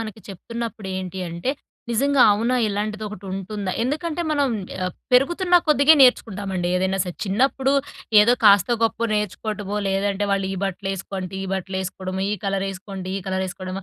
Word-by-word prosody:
మనకి 220 -1 -7
చెప్తున్నప్పుడేంటి 190 -3 -5
అంటే, 170 +9 -2 0.4
"నిజంగా 275 +3 +3
అవునా! 235 +5 +1
ఇలాంటిదొకటుంటుందా?" 205 -1 -4
ఎందుకంటే, 310 +5 -2
మనం 285 -2 +2 0.4
ఆహ్, 180 - -2 0.2
పెరుగుతున్నా 350 +7 +4
కొద్దిగే 300 +1 +6
నేర్చుకుంటామండి 195 -7 +2
ఏదైనా 190 +1 0
సరే! 180 -2 -6
చిన్నప్పుడు 265 +6 +1 0.5
ఏదో 235 +4 +5
కాస్తో, 205 +3 +6
గొప్పో 230 +1 +1
నేర్చుకోటమో, 210 0 -3
లేదంటే 200 +1 0
వాళ్ళు 195 -1 0
ఈ - - -3
బట్టలేసుకో 195 0 -4
అంటే 185 +1 -6
ఈ - - -5
బట్టలేసుకోడమో, 190 0 -4
ఈ - - +1
కలరేసుకోంటే 195 -1 -3
ఈ - - -7
కలరేసుకోడమో. 190 0 -4
200 Hz, 130 wpm, -22 LUFS, 190-230 Hz, 0.5 s, కొద్దిగే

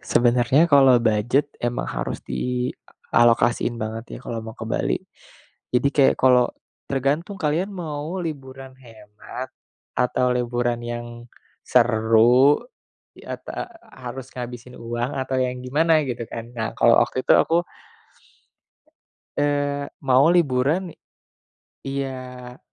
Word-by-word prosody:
Sebenernya 120 +5 +3
kalau 135 -5 +6
budget 120 +5 +1
emang 120 0 -1
harus - - -4
dialokasiin 120 - 0
banget 110 +1 -5
ya - - -10
kalau 115 -1 -4
mau 110 +1 -9
ke 115 - -6
Bali. 110 - 0 0.7
Jadi 125 +3 +2
kayak 140 -2 +4
kalau 125 -1 +4 0.4
tergantung 145 +8 -1
kalian 160 +5 0
mau 160 -1 -5
liburan 135 -3 -7
hemat, 115 +1 -10 0.4
atau 125 0 +1
liburan 120 -1 -1
yang 120 0 -4 0.6
seru, 120 +3 +4 0.6
i - - -14
a - - -3
tak - - -6 0.3
harus 130 0 -7
ngabisin 125 0 -7
uang 120 +3 -3
atau 130 -1 -2
yang 125 0 -1
gimana, 155 +4 +2
gitu 125 -3 -4
kan, 115 +1 -8
Kak. 125 - -20
Nah 110 -1 -2
kalau 115 - +5
waktu 130 - 0
itu - - +3
aku 170 +1 +3 1.7
eee, 145 -1 0
mau 135 +4 +4
liburan, 160 +2 +1 0.9
iya 130 -2 -6
125 Hz, 120 wpm, -23 LUFS, 120-140 Hz, 1.7 s, kalau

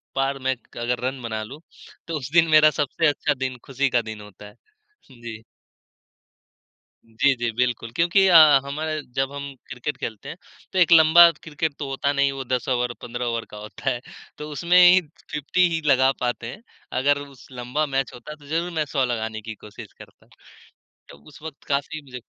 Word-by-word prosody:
पार 135 0 0
मैं 130 - +2 0.2
क - - -13
अगर 120 +1 -2
रन 130 -1 -5
बना 110 -2 -4
लूँ, 135 +8 -10 0.5
तो 165 - -3
उस 135 -3 -6
दिन 165 -1 +5
मेरा 155 0 +7
सबसे 150 +3 0
अच्छा 145 0 +1
दिन 130 -2 -4
खुशी 135 0 -1
का 120 -1 +2
दिन 110 -1 -8
होता 105 0 -13
है। 105 - -15 0.6
जी। 115 -3 -10 1.6
जी, 115 +5 +1
जी। 120 -1 -2
बिल्कुल 120 -1 -2
क्योंकि 175 +5 +3
अ, 175 -3 +8 0.3
हम 140 +2 -5 0.4
जब 135 0 0
हम 140 -1 -7 0.2
क्रिकेट 135 +3 -5
खेलते 110 -3 -6
हैं 165 - -8 0.4
तो 190 - +1
एक 175 -1 +4
लंबा 165 +1 +8
क्रिकेट 155 -1 -4
तो 145 - -4
होता 135 +1 -1
नहीं, 140 0 +2
वो 135 0 -5
10 125 -1 -2
ओवर 125 -1 0
15 120 +1 -5
ओवर 115 -1 -2
का 105 - -9
होता 105 +5 -5
है। 125 -2 -3 0.4
तो 150 0 -7
उसमें 170 +5 +2
ही 180 +1 +8 0.3
50 165 +5 +1
ही 160 - -1
लगा 130 -2 +4
पाते 120 -2 -2
हैं। 210 - -13 0.4
अगर 145 +1 +2
उस 135 -2 -17
लंबा 125 +4 -2
मैच 135 -3 -2
होता 125 +5 -10
तो 150 -1 -19
ज़रूर 165 +4 -2
मैं 160 -2 -1
100 135 -2 +3
लगाने 110 -2 -3
की 110 0 -8
कोशिश 105 0 -11
करता। - - -17 0.8
तो 70 - -14
उस - - -16
वक़्त 160 -2 -10
काफ़ी 145 +2 -2
मुझे 125 -2 -9
135 Hz, 195 wpm, -23 LUFS, 120-150 Hz, 1.6 s, अ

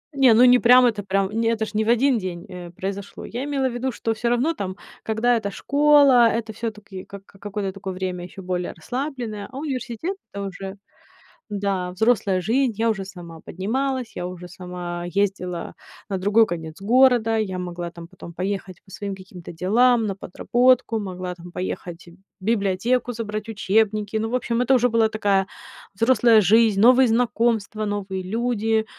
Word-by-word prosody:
Не, 265 -4 +6
ну 240 - +6
не 250 0 +7
прям 250 +1 +7
это 220 -4 +1
прям 195 0 0
это 225 +1 0
ж 215 - -10
не 215 +1 +1
в 220 - -2
1 245 +1 +3
день, 180 -3 -6
э, 180 -2 -9
произошло. 195 +3 -6
Я 245 +3 -5
имела 275 -2 0
в 250 - -4
виду, 255 +2 -2
что 225 -1 -2
всё 235 +2 -2
равно 245 +7 +1
там, 190 - -5 0.3
когда 225 +2 +1
эта 215 -3 -2
школа, 280 0 +5
это 225 -1 -3
всё-таки 210 -4 -6
как 200 0 -12
какое-то 200 0 -5
такое 195 -1 -6
время 185 -1 -4
ещё 190 +1 -11
более 180 -1 -3
расслабленное. 245 - -5
А 265 - -9
университет 275 - -4 0.2
это 200 - -5
уже, 195 +1 -7 0.7
да, 195 -3 -2
взрослая 195 -2 +1
жизнь, 240 +6 +1
я 225 +2 +1
уже 195 -3 -4
сама 175 -4 -10
поднималась, 255 +6 -2
я 175 - -3
уже 180 -1 -8
сама 175 -1 -6
ездила 180 -2 -2 0.4
на 195 - -1
другой 205 +4 +4
конец 165 -3 -6
города, 235 0 +4
я 195 -4 -2
могла 175 -1 -5
там 170 0 -11
потом 175 -1 -12
поехать 185 0 -4
по 190 - -18
своим 200 0 -5
каким-то 185 -2 -11
делам, 225 +8 +3
на 195 -2 -2
подработку, 240 +5 +1
могла 185 -3 -5
там 175 0 -12
поехать 175 -1 -6
в 170 - -14 0.3
библиотеку, 225 +3 0
забрать 215 -1 -5
учебники. 215 0 0
Ну, 220 +1 -2
в 245 - -1
общем, 240 -1 -1
это 250 +2 +3
уже 245 0 +3
была 225 -1 +3
такая 200 -3 +1 0.5
взрослая 230 0 +5
жизнь, 215 +1 +4
новые 250 +4 +6
знакомства, 225 -2 0
новые 200 -2 -3
люди. 225 +1 0
210 Hz, 175 wpm, -23 LUFS, 185-235 Hz, 0.7 s, не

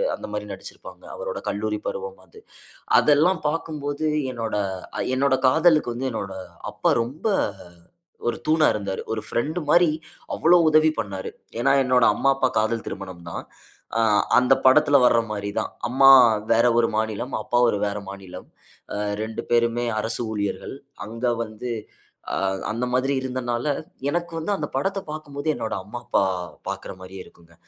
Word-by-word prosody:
அந்தமாரி - - -5
நடுச்சிருப்பாங்க. - - -11
அவரோட - - -4
கல்லூரி - - -2
பருவம் 485 -1 -5
அது. 440 - -16 0.6
அதெல்லாம் 155 +4 +3
பாக்கும்போது, 150 -1 -3 0.3
என்னோட 115 -3 -3 0.4
அ - - 0 0.2
என்னோட 135 0 +3
காதலுக்கு 155 -2 +4
வந்து 130 +2 -2
என்னோட 100 -3 -4 0.4
அப்பா - - +1
ரொம்ப 135 - -6 1.0
ஒரு 120 - -1
தூணா 155 0 +4
இருந்தாரு. 100 -2 -3
ஒரு 110 - -2
ஃபிரெண்ட்மாரி, 155 +5 +2 0.4
அவ்வளவு 170 0 +5
உதவி 155 0 +5
பண்ணாரு. 100 -4 -4 0.3
ஏனா, 135 +3 +3
என்னோட 125 -2 +3
அம்மா, 135 - +2
அப்பா 130 -1 +2
காதல் 110 +1 0
திருமணம் 95 -3 -7
தான். - - -5 0.5
ஆ - - +3 0.4
அந்த 125 - +5
படத்தில 145 +2 +6
வர்றமாரி 105 -4 +1
தான். - - -4 0.2
அம்மா 135 +3 +5 0.4
வேற 115 +1 +4
ஒரு 115 - +3
மாநிலம், 110 +4 -2
அப்பா 120 - 0
ஒரு 105 - +1
வேற 100 0 -2
மாநிலம். 95 -2 -10 0.5
அ - - -3 0.3
2 110 0 -4
பேருமே 120 0 +2 0.2
அரசு 115 +3 -2
ஊழியர்கள். 105 +4 -3 0.3
அங்க 115 +3 -4 0.2
வந்து 110 +3 -7 0.6
அ - - -2 0.4
அந்த 115 +3 -2
மாதிரி 130 +2 +1
இருந்தனால, 125 -1 -2 0.4
எனக்கு 170 +2 -2
வந்து 165 +6 -2
அந்த - - -3
படத்த 195 +1 0
பாக்கும்போது, 150 -1 -6
என்னோட 110 - -3
அம்மா, 105 +5 -7
அப்பா - - +2 0.5
பாக்கிற - - -5
மாரியே 95 0 -9
இருக்குங்க. 85 -1 -20
125 Hz, 145 wpm, -24 LUFS, 110-155 Hz, 1.0 s, படத்தில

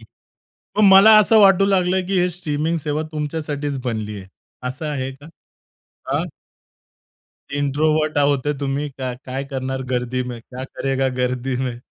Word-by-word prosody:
मग 210 +2 -8
मला 195 +3 +8
असं 215 +1 +5
वाटू 195 -1 +6
लागलं, 190 -1 +2
की 195 -1 0
हे 180 - +2
स्ट्रीमिंग 160 -2 -1
सेवा 150 0 -2
तुमच्यासाठीच 150 -2 -3
बनली 110 -3 -3
आहे. 95 - -11 0.4
असं 130 +5 -5
आहे 135 -2 -3
का? 140 +2 -15 0.9
हां. - - 0 1.3
इंट्रोव्हर्ट 155 +2 +1
आहोत 140 -2 +2
ते 150 - +1
तुम्ही, 140 +1 -2
का 130 -2 -5
काय 135 +2 -4
करणार 130 -1 -4
गर्दी 125 +1 -1
में, 125 -2 -7
क्या 130 +2 -8
करेगा 135 0 -1
गर्दी 125 +1 -1
में? 125 -2 -3
145 Hz, 145 wpm, -21 LUFS, 130-155 Hz, 1.3 s, मला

